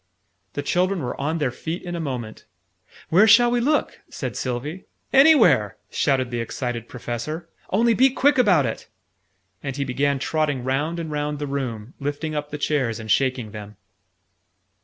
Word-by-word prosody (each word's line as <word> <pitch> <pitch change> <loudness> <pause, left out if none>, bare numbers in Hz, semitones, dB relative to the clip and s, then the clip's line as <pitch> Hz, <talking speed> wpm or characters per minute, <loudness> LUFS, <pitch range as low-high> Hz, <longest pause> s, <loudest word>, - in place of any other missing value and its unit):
The 145 - -3
children 180 +2 +1
were 125 +2 -4
on 155 +4 -1
their 145 -6 0
feet 165 +7 -5
in 175 -1 -5
a - - -3
moment. 125 -8 -5 0.6
"Where 195 +7 +6
shall 240 +2 +6
we 245 - +2
look?" 295 +5 0
said - - -5
Sylvie. 135 +8 -4 0.3
"Anywhere!" 225 - +5
shouted 130 -4 +1
the 120 - -2
excited 115 0 -4
Professor. 125 +7 -5 0.2
"Only 230 +4 +3
be 260 +4 +5
quick 265 +1 +2
about 185 - +4
it!" 110 - -4 0.7
And 135 -2 -4
he 140 - 0
began 140 +2 0
trotting 145 -2 -1
round 145 +6 -1
and 160 -2 -5
round 150 0 -2
the 145 - -3
room, 130 -5 -4
lifting 145 +2 -3
up 150 -1 -3
the 150 - -5
chairs, 135 -7 0
and 110 -1 -4
shaking 130 -5 +1
them. 105 -1 -9
145 Hz, 165 wpm, -23 LUFS, 125-175 Hz, 0.7 s, Where